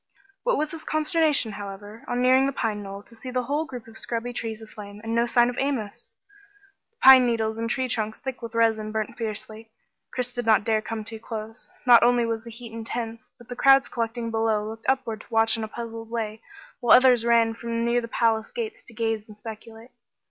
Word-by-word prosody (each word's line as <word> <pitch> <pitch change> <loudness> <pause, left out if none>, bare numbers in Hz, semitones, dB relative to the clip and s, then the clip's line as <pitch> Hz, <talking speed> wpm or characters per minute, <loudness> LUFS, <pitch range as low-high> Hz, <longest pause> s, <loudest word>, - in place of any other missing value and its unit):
What - - +1
was 305 0 -1
his 325 -1 -8
consternation, 310 - +2
however, 205 +2 -8
on 245 0 0
nearing 260 +1 +5
the - - 0
pine 220 -5 -2
knoll, 200 0 -8
to 235 - -18
see 230 +3 -9
the 250 0 -1
whole 290 +5 -1
group 250 -6 -8
of 220 0 -9
scrubby 240 +1 -3
trees 225 -2 -4
aflame, 210 -2 -10
and 225 0 -3
no 235 +1 +2
sign 240 0 +4
of 245 0 -3
Amos! 240 -5 -2 0.8
The 460 - -49
pine 260 -2 +9
needles 220 -1 -1
and 230 0 -2
tree 260 +1 0
trunks 220 -2 -2
thick 265 -3 -6
with 230 -1 -7
resin 220 -2 +2
burnt 220 +1 -3
fiercely. 220 0 -6 0.4
Chris 250 -1 -3
did 245 - -3
not 220 -2 +5
dare 220 -1 +1
to - - -14
come 225 -1 -4
too 220 +1 -8
close. 220 0 -7 0.2
Not 240 -2 +8
only 240 0 +4
was 225 -1 -2
the 235 - -9
heat 230 0 -10
intense 225 0 -5
but 240 -2 -16
the 245 - -6
crowds 270 +1 +5
collecting 230 0 -3
below 220 -1 +1
looked 225 +2 -5
upward 245 -5 -1
to - - -17
watch 225 -1 +3
in 225 - -3
a - - -3
puzzled 225 0 -7
way, 220 -1 -4 0.4
while 240 0 +7
others 250 -2 +5
ran 230 -1 +4
from 230 0 -3
near 240 +1 +2
the 230 - -6
palace 225 -1 +1
gates 450 -4 -5
to 235 - -15
gaze 225 -1 -1
and 210 -1 -13
speculate. 225 +2 -10
230 Hz, 220 wpm, -25 LUFS, 220-245 Hz, 0.8 s, pine